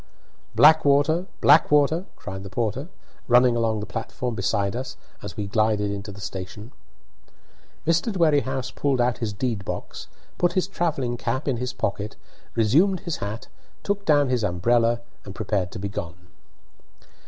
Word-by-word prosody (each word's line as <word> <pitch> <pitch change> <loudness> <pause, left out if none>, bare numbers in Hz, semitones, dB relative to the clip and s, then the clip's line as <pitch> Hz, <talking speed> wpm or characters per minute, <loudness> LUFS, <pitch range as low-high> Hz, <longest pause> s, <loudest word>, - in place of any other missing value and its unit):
"Blackwater! 155 +2 +5
Blackwater!" 150 +3 +5
cried 95 -1 -7
the 95 - -8
porter, 115 - -2 0.4
running 125 0 +5
along 115 -2 0
the - - -4
platform 120 +2 -4
beside 100 0 0
us 130 +1 -5 0.2
as 100 -4 -8
we 105 - -2
glided 105 0 +1
into 100 +1 -5
the 100 - -11
station. 95 +4 -7 1.1
Mr. 170 +7 +2
Dwerrihouse 140 -8 +1
pulled 140 -3 0
out 120 0 +1
his 115 -3 -2
deed 105 0 -2
box, - - -6 0.3
put 175 0 +2
his 185 -1 +1
travelling 150 -10 -1
cap 120 +5 -2
in 130 -4 +1
his 125 +1 -3
pocket, 100 -1 -3 0.4
resumed 155 - +3
his 170 -5 -3
hat, 105 +3 -5 0.4
took 200 0 -1
down 145 -5 +3
his 125 -3 0
umbrella, 115 +6 +2 0.2
and 100 -1 -9
prepared 100 -4 -1
to - - -7
be 100 - -3
gone. 85 -5 -5
120 Hz, 150 wpm, -24 LUFS, 105-145 Hz, 1.1 s, Blackwater